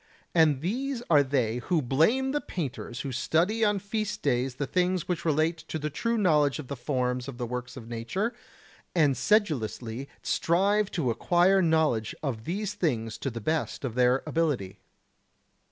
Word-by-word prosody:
And 155 -5 +4
these 245 - -2
are 150 -2 +7
they 130 -5 0
who 165 +7 0
blame 165 - +2
the 295 +1 0
painters 130 -6 -5
who 140 - -4
study 175 - +1
on 205 -1 +3
feast 210 +2 -3
days 125 -2 +1
the 145 - -2
things 180 +3 0
which 180 -2 -2
relate 160 +1 +2
to - - -3
the 150 0 -3
true 230 +9 -1
knowledge 150 -8 +3
of 150 -5 -8
the 140 - -3
forms 125 -1 -1
of 135 -3 -7
the 120 - -3
works 125 +2 -5
of 115 -3 -9
nature, 120 - -2 0.6
and 150 -5 +4
sedulously 135 - 0
strive 200 +4 +2
to 140 -9 0
acquire 180 +9 +3
knowledge 160 - +1
of 120 -6 -3
these 200 +4 -2
things 120 - -1
to 135 - -2
the 115 -2 -6
best 155 +2 -1
of 120 - -3
their 125 +2 +3
ability. 125 - -1
150 Hz, 170 wpm, -28 LUFS, 125-185 Hz, 0.6 s, are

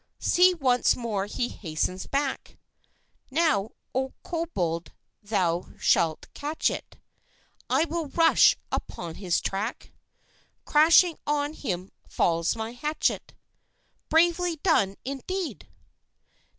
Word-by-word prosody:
"See, 360 +1 +4
once 255 -6 +3
more 210 -5 -2
he 240 +3 -2
hastens 180 0 -3
back! 275 -1 -2 0.7
Now, 275 -8 +1 0.2
O 265 +1 -1
Cobold, 180 - -3 0.3
thou 185 -5 -1
shalt 160 -2 +2
catch 300 +2 -1
it! - - -7 0.7
I 270 +6 +3
will 330 -1 -3
rush 325 +3 +5
upon 170 -2 -4
his 180 -3 +1
track; 205 +5 -4 0.7
Crashing 325 +3 +5
on 295 0 0
him 185 - -4 0.2
falls 170 +2 +1
my 225 0 -4
hatchet. 300 +6 -2 0.7
Bravely 340 +1 +3
done, 200 - +3
indeed! 320 +7 -4
265 Hz, 100 wpm, -26 LUFS, 195-320 Hz, 0.7 s, rush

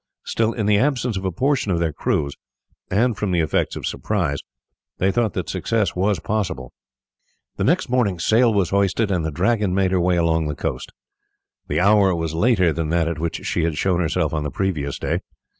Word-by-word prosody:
Still 115 0 0
in 110 - -2
the 105 -1 +4
absence 125 -4 0
of 95 0 -4
a 95 - 0
portion 130 - 0
of 85 - +1
their 85 -2 0
crews, 70 0 -1 0.6
and 115 +4 +2
from 105 -1 -2
the 90 -2 +1
effects 80 -2 0
of - - -5
surprise, 90 -10 -1 0.6
they 95 +1 +2
thought 115 -3 0
that - - -3
success 110 -6 -1
was 95 0 +1
possible. 90 - -3 0.8
The - - -1
next - - +2
morning 120 -7 +1
sail 115 +8 +3
was 100 -5 +1
hoisted, 100 +2 +1
and 90 -4 0
the 80 - -1
Dragon 95 +4 +1
made 95 -1 +2
her 95 -2 +2
way 90 +1 +2
along 80 -2 +1
the 75 - -3
coast. - - -4 0.8
The 75 - 0
hour 100 -1 +4
was 80 -2 -3
later 90 -2 +3
than 80 0 -2
that 85 0 +1
at 85 -2 -3
which 80 0 -3
she 85 - 0
had 80 -2 -1
shown 90 -1 +1
herself 80 -2 0
on 75 - -1
the 75 - -2
previous 75 -3 -2
day. - - -1
95 Hz, 205 wpm, -22 LUFS, 80-105 Hz, 0.8 s, the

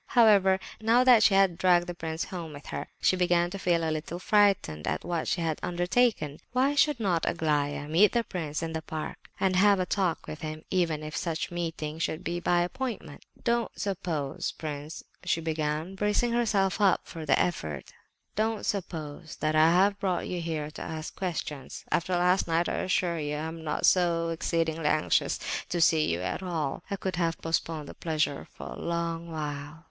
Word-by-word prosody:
However, 200 -5 +6 0.2
now 230 +3 +4
that 250 -3 +7
she 200 - +5
had 190 -3 +3
dragged 175 -1 +4
the 175 - -5
prince 160 -1 -4
home 170 -4 -6
with 145 0 -11
her, - - -4
she - - +3
began 175 -1 +2
to 195 - -5
feel 170 -3 +1
a - - 0
little 155 +2 -4
frightened 195 - +2
at - - -2
what 170 -2 -2
she 175 - 0
had 160 -2 -1
undertaken. 175 - +1
Why 265 +3 +3
should 290 -2 +3
not 180 -7 +1
Aglaya 145 -3 0
meet 175 +7 +4
the 235 -1 +2
prince 165 -6 -4
in 165 0 -3
the 160 - -2
park 155 0 -5 0.2
and 190 -1 +2
have 200 +1 +5
a 185 - +1
talk 180 -3 0
with 155 - -7
him, 155 0 -5
even 165 -5 +1
if 155 0 -6
such 165 -1 -2
a - - -8
meeting 160 -2 -3
should 160 -1 -2
be 175 +2 -2
by 175 0 +2
appointment? 230 - -4 0.2
"Don't 235 0 0
suppose, 170 -8 -2
prince," 150 0 -6 0.2
she 175 -2 +1
began, 155 +1 -2
bracing 210 +4 +1
herself 215 -4 +1
up 195 -3 +4
for 165 - -8
the 155 - +3
effort, 80 - -2 0.4
"don't 220 +1 0
suppose 160 -5 -4
that 155 0 -1
I 155 +1 +6
have 195 +3 +3
brought 185 -3 -1
you 180 -1 -3
here 155 -2 -3
to - - -9
ask 160 -1 -5
questions. 155 -7 -4
After 185 +2 +1
last 180 +2 +3
night, 165 +1 +1
I - - -1
assure 180 -2 0
you, 150 -1 -2
I - - -3
am 160 +1 -5
not 155 - 0
so 170 -2 +3
exceedingly 165 -1 -1
anxious 155 0 +2 0.3
to 175 - -1
see 160 -2 +4
you 85 +2 -1
at 90 - -3
all; 165 -7 -3
I 200 - -1
could 190 -2 -3
have 165 -2 0
postponed 165 -2 -2
the - - -8
pleasure 155 -3 -1
for - - -8
a - - -7
long 170 0 -2
while." 150 -1 -5
170 Hz, 195 wpm, -28 LUFS, 155-190 Hz, 0.4 s, that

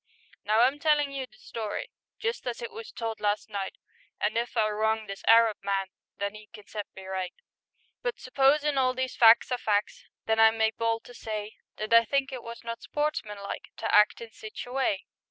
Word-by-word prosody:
Now 215 +2 +3
I'm 265 +4 +3
tellin' 295 -2 +3
you 270 -2 -4
the - - -22
story 220 -3 -5 0.3
Just 460 +2 -3
as - - -3
it 470 -1 -5
was 455 0 -8
told 225 -1 -4
last 210 +1 -1
night, 195 -2 -3 0.4
And 210 +1 0
if 235 +1 -1
I 215 -1 +4
wrong 220 +1 0
this 195 -1 -8
Arab 225 -1 +6
man 195 -1 -1 0.3
Then 200 +1 -3
'e 215 0 -12
can 210 -2 -12
set 210 0 -6
me 190 - -10
right; 190 -1 -4 0.7
But - - -2
s'posin' 275 +2 +3
all 255 -1 +2
these 260 0 -2
fac's 230 +2 +7
are 250 - 0
fac's, 210 -2 0 0.2
Then 220 0 +1
I 225 0 +9
make 220 0 +1
bold 230 0 0
to 245 - -13
say 215 -2 -5 0.2
That 215 +1 -2
I 230 0 +8
think 275 +3 0
it 255 - -5
was 235 +1 -9
not 230 0 -5
sportsmanlike 210 -10 -3
To 225 - -2
act 210 +2 +5
in 230 -1 -8
sich 215 0 -8
a 245 - -10
way. 270 +3 0
225 Hz, 205 wpm, -28 LUFS, 210-260 Hz, 0.7 s, I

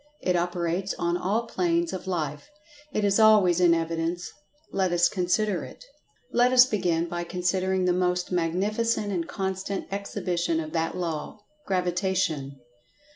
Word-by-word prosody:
It 180 - +1
operates 175 +2 -1
on 170 0 0
all 200 +6 0
planes 170 -5 0
of 190 0 -6
life. 155 - -3 0.4
It 215 -5 0
is 200 +1 +3
always 210 -5 +5
in 175 -2 +5
evidence. 165 +1 -2 0.4
Let 190 -2 0
us 175 0 +4
consider 185 +1 0
it. - - -11 0.5
Let 245 +1 +3
us 255 0 +8
begin 175 -8 0
by 175 0 -3
considering 185 +1 0
the 180 - +3
most 180 0 0
mag[Pg 165 -1 0
136]nificent 215 0 0
and 170 -4 -2
constant 190 0 -3
exhibition 180 -4 -1
of 155 -1 -5
that 165 +1 -1
Law—Gravitation. 180 - -2
180 Hz, 140 wpm, -26 LUFS, 170-195 Hz, 0.5 s, us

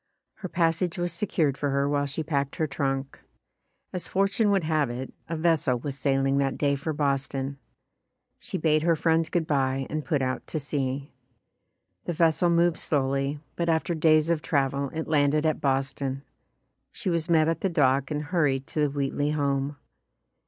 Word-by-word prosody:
Her 185 - -6
pas 165 -2 +2
sage 175 -1 -2
was 175 -1 -1
secured 165 -6 0
for 145 - 0
her 140 +1 +1
while 145 0 0
she 145 +3 -2
packed 140 -3 -1
her 160 - 0
trunk. 135 -2 -3 0.7
As 180 - -4
fortune 195 +3 +2
would 195 -3 +2
have 155 -4 +1
it, 125 +2 -6 0.2
a 165 - -2
vessel 155 -6 +2
was 135 +3 -4
sailing 135 0 +1
that 135 -1 0
day 140 -1 +2
for 140 +3 -3
Boston. 140 -1 -1 0.8
She - - -4
bade 155 -1 +2
her 165 +1 +3
friends 160 0 +1
good 170 -2 0
bye 135 -2 0
and 155 0 -2
put 140 0 0
out 130 0 -3
to 155 - -3
sea. 140 -1 -3 0.9
The 175 - -2
vessel 165 +2 +3
moved 170 0 +3
slowly, 140 0 0
but 170 -1 -1
after 165 +2 +1
days 155 0 +3
of 165 -2 0
travel 140 -2 0
it 160 +2 -5
landed 150 0 +2
at 155 - +1
Bos 135 -1 +1
ton. 135 0 -4 0.7
She 195 -6 -2
was 165 0 -1
met 160 -2 +4
at 165 -1 -1
the 195 - +1
dock 135 -4 +2
and 150 0 -2
hurried 145 -5 +1
to 155 - -5
the 150 -1 +3
Wheatley 140 +1 -1
home. 140 -1 -1
145 Hz, 180 wpm, -26 LUFS, 135-165 Hz, 0.9 s, met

